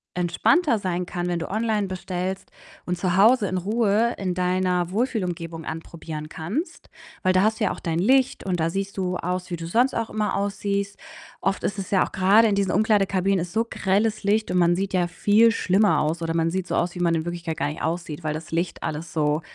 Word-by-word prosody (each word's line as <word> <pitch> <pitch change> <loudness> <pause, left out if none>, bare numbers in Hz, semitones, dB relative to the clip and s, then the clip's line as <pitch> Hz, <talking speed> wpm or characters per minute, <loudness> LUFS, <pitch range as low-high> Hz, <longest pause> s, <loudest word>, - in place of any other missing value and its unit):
entspannter 225 - +2
sein 180 -2 -2
kann, 175 -1 -3
wenn 175 -1 -1
du - - -5
online 215 -1 0
bestellst 185 +1 -4 0.3
und 180 0 -2
zu 180 0 0
Hause 220 +1 +5
in 185 - -2
Ruhe 215 +4 +1
in 185 -2 -2
deiner 180 -1 0
Wohlfühlumgebung 180 - -2
anprobieren 160 -1 -7
kannst, 210 - -5 0.3
weil 185 0 +3
da 185 - +4
hast 220 +3 +1
du - - 0
ja 200 - +2
auch - - -6
dein 165 -1 -2
Licht 260 +8 +2
und 180 -2 -1
da 165 +1 +1
siehst 195 +2 -3
du 180 -1 -1
aus, 180 +1 -3
wie 175 - -2
du 165 0 -7
sonst 245 +10 +2
auch 230 -1 -2
immer 215 -1 -1
aussiehst. 200 +1 -2 0.4
Oft 195 0 -1
ist 200 0 -2
es 190 - -5
ja 190 - +3
auch - - -13
grade 200 +4 +5
in 210 - +1
diesen 200 -1 +1
Umkleidekabinen 195 -2 +2
ist 175 +1 -5
so 225 +2 +1
grelles 210 +3 0
Licht 215 +2 +1
und 180 - +2
man 175 0 +4
sieht 195 +2 -3
ja 180 -2 +2
viel 205 +6 +4
schlimmer 205 -1 +2
aus 155 +3 -1
oder 165 0 -2
man 165 0 +1
sieht 185 0 -2
so - - -2
aus, 175 0 0
wie 180 - -8
man 170 -1 +2
in 160 0 -2
Wirklichkeit 175 -2 -4
gar - - 0
nicht 150 - -7
aussieht, 165 -1 -3
weil 155 -1 -2
das 160 +2 -8
Licht 170 +2 -2
alles 160 +2 -4
so 150 0 +1
185 Hz, 225 wpm, -24 LUFS, 170-205 Hz, 0.4 s, Hause